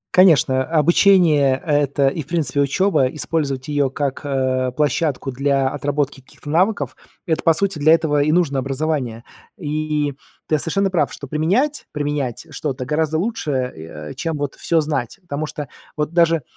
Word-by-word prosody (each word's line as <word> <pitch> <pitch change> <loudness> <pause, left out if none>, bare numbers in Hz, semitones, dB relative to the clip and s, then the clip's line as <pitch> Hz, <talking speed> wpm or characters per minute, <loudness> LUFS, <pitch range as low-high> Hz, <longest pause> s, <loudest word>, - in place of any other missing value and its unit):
Конечно, 150 -8 +5
обучение- 155 -3 +4
это 145 -2 +2
и 140 +4 -1
в 140 - -11
принципе 155 -4 0
учеба. 155 0 +2
Использовать 140 -2 -2
ее 145 -2 +1
как, 135 0 -3
э, 130 -2 0
площадку 145 -2 0
для 135 +1 +1
отработки 145 0 -2
каких-то 145 +3 -10
навыков, 190 +6 +1 0.3
это, 160 -4 0
по 165 - +4
сути, 190 -1 -1
для 155 +3 +6
этого 155 -3 +2
и 150 +2 +2
нужно 155 -6 +2
образование. 135 -4 -2 0.3
И 150 -2 -1 0.3
ты 155 - +1
совершенно 195 +5 0
прав, 155 -6 +1
что - - -8
применять, 190 - 0
применять 145 -3 -2
что-то 135 -3 -4
гораздо 155 +3 0
лучше, 220 -2 -2
э, 80 - -4
чем 165 -2 -3
вот 145 -1 -3
всё 165 -2 +1
знать. 145 - -3
Потому 155 -2 -4
что 150 -2 -6 0.3
вот 150 +2 -2
даже, 165 -4 +3
150 Hz, 155 wpm, -20 LUFS, 135-160 Hz, 0.3 s, для